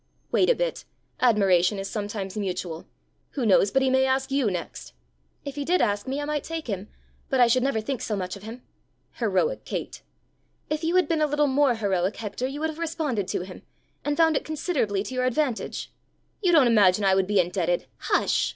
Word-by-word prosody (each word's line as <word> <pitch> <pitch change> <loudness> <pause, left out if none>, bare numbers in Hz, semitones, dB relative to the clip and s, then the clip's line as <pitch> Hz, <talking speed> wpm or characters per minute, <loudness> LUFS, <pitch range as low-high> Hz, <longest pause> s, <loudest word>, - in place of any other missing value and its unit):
"Wait - - +3
a - - +5
bit. - - -2 0.4
Admiration 195 -5 +3
is 195 0 -4
sometimes 205 -2 -4
mutual: 185 -5 -4 0.5
who 265 -5 -2
knows 200 -1 +5
but 270 +5 +2
he 265 - +3
may 265 0 +4
ask 265 0 0
you 270 -5 +2
next!" 175 - -6 0.5
"If 280 - -5
he 285 - -1
did 355 +5 +2
ask 205 -1 0
me, 270 +2 -2
I 290 - -3
might 295 -1 -2
take 325 -1 -5
him, 200 -3 -4 0.4
but 265 - +1
I 245 - +8
should 240 +2 +3
never 265 -3 +1
think 250 +2 -3
so 220 -4 -2
much 185 -1 -4
of 200 - -11
him!" 225 +4 -9 0.6
"Heroic - - 0
Kate!" - - -5 0.7
"If 305 +1 -1
you 335 +2 0
had 365 - +4
been 325 -2 0
a 305 - +3
little 295 0 +2
more 275 -2 +3
heroic, 195 -3 0
Hector, 230 +3 -4
you 280 +3 -6
would 320 - 0
have 315 - -12
responded 310 - -2
to - - -2
him 185 0 -9 0.4
and 290 0 -1
found 325 -1 +4
it - - 0
considerably 285 - -1
to 260 - -7
your 255 0 0
advantage." 255 -1 -1 0.5
"You 365 -4 +3
don't 310 -6 +6
imagine 205 -4 +4
I 190 - +5
would 190 -1 +2
be 205 -1 +2
indebted 175 -1 0
" - - -40
"Hush! - - +2
245 Hz, 215 wpm, -25 LUFS, 195-290 Hz, 0.7 s, I